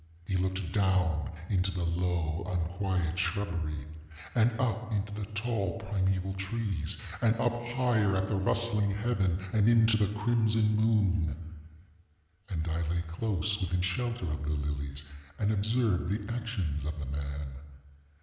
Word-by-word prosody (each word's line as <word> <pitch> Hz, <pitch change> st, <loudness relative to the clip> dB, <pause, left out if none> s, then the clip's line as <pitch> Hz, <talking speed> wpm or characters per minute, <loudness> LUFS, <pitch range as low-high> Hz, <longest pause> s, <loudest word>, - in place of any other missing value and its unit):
He 95 Hz, -, -1 dB
looked 95 Hz, -1 st, -1 dB
down 95 Hz, -6 st, +2 dB, 0.2 s
into 95 Hz, -1 st, +2 dB
the 90 Hz, -2 st, -2 dB
low 85 Hz, -2 st, 0 dB
unquiet 90 Hz, 0 st, -1 dB
shrubbery, 85 Hz, -7 st, -1 dB, 0.5 s
and 120 Hz, 0 st, +4 dB
up 115 Hz, -2 st, 0 dB
into 105 Hz, -1 st, -1 dB
the 105 Hz, -1 st, -4 dB
tall 105 Hz, -5 st, 0 dB
primeval 95 Hz, -1 st, 0 dB
trees, 95 Hz, -5 st, -2 dB, 0.2 s
and 115 Hz, -1 st, +4 dB
up 120 Hz, 0 st, 0 dB
higher 120 Hz, -5 st, +2 dB
at 95 Hz, 0 st, +1 dB
the 105 Hz, -, 0 dB
rustling 105 Hz, +1 st, +2 dB
heaven, 100 Hz, -4 st, +1 dB, 0.2 s
and 110 Hz, 0 st, +5 dB
into 115 Hz, -1 st, +6 dB
the 105 Hz, -2 st, +2 dB
crimson 110 Hz, -1 st, +3 dB
moon. 100 Hz, -8 st, +2 dB, 1.1 s
And 85 Hz, -4 st, -2 dB
I 80 Hz, 0 st, 0 dB
lay 85 Hz, 0 st, 0 dB
close 100 Hz, +3 st, -1 dB
within 90 Hz, -1 st, 0 dB
shelter 115 Hz, +4 st, -1 dB
of 75 Hz, -, -3 dB
the 75 Hz, -, -3 dB
lilies, 70 Hz, 0 st, -3 dB, 0.3 s
and 105 Hz, 0 st, +1 dB
observed 110 Hz, -3 st, +1 dB
the 105 Hz, +2 st, -2 dB
actions 100 Hz, -, -2 dB
of 75 Hz, +1 st, -3 dB
the 75 Hz, -, -4 dB
man. 70 Hz, +1 st, -4 dB
95 Hz, 140 wpm, -31 LUFS, 85-110 Hz, 1.1 s, into